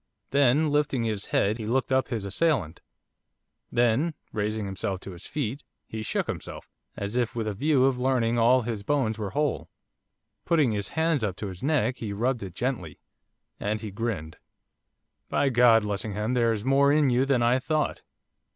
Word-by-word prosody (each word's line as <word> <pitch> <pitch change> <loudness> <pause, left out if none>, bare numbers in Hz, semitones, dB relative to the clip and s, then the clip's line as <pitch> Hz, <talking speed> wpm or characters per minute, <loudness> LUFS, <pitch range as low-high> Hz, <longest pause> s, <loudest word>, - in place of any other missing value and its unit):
Then, 145 +2 +3
lifting 145 -4 +1
his 110 -3 -2
head, 105 +4 +1
he 110 - -4
looked 130 +3 0
up 130 0 +2
his 110 -5 -3
assailant. 105 - 0 0.9
Then, 120 +7 +2 0.2
raising 105 0 -1
himself 95 -1 -3
to 95 - -8
his 85 -2 -9
feet, 140 -2 -3 0.2
he 110 - -6
shook 110 - -1
himself, - - -6 0.3
as 100 +3 -4
if 120 -2 0
with 115 -2 -2
a 105 - -1
view 135 +4 +2
of 135 -2 +1
learning 125 -3 +1
if 120 - +1
all 125 +3 +5
his 110 -3 -3
bones 110 -3 0
were 105 -2 -3
whole. 145 +2 -1 0.7
Putting 155 -8 +3
his 100 -2 -2
hands 160 -5 +2
up 100 -4 -1
to 105 - -5
his 90 -2 -9
neck, 135 -3 +1
he 105 -3 -4
rubbed 120 +4 0
it, 95 -3 -7
gently. 120 - -3 0.6
And 105 +1 -2
he 110 -3 -6
grinned. 95 -7 -4 0.9
'By 140 - +2
God, 120 -3 +5
Lessingham, 105 +2 -2
there's 115 -3 +1
more 140 +1 +4
in 145 -3 +3
you 125 +2 +3
than 130 -4 +2
I 120 +2 +3
thought. 155 +2 -1
120 Hz, 180 wpm, -26 LUFS, 105-135 Hz, 0.9 s, all